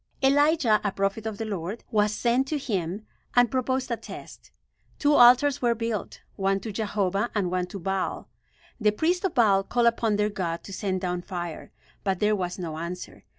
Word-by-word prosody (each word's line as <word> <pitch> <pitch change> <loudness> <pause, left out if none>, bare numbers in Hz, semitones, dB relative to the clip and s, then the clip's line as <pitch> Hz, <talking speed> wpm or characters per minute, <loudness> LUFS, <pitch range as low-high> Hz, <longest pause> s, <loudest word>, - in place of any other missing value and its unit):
Elijah, 280 -4 +4
a 205 - 0
prophet 195 +3 -1
of 215 -2 -4
the 225 - -3
Lord, 200 +1 -4
was 210 -1 +3
sent 240 +4 +1
to 305 - -1
him 200 - -3 0.3
and 245 -2 +5
proposed 260 0 -1
a 235 - 0
test. - - -11 0.5
Two 290 0 +3
altars 255 +2 +6
were 240 -2 +2
built; 230 -2 -4
one 195 0 +1
to 220 - -5
Jehovah 205 0 -1
and 190 -4 0
one 180 -1 -1
to 190 - -7
Baal. 195 +1 -2 0.5
The 210 -2 +3
priests 345 - 0
of 375 - -1
Baal 205 -5 +5
called 240 +4 +1
upon 230 -2 +2
their 210 +1 +1
god 170 -4 -3
to 195 - -9
send 185 -2 -2
down 180 -1 -2
fire; 175 -3 -6 0.3
but 195 -2 0
there 210 0 +3
was 180 -2 -3
no 160 -4 -5
answer. 175 +2 -7
210 Hz, 190 wpm, -26 LUFS, 190-240 Hz, 0.5 s, altars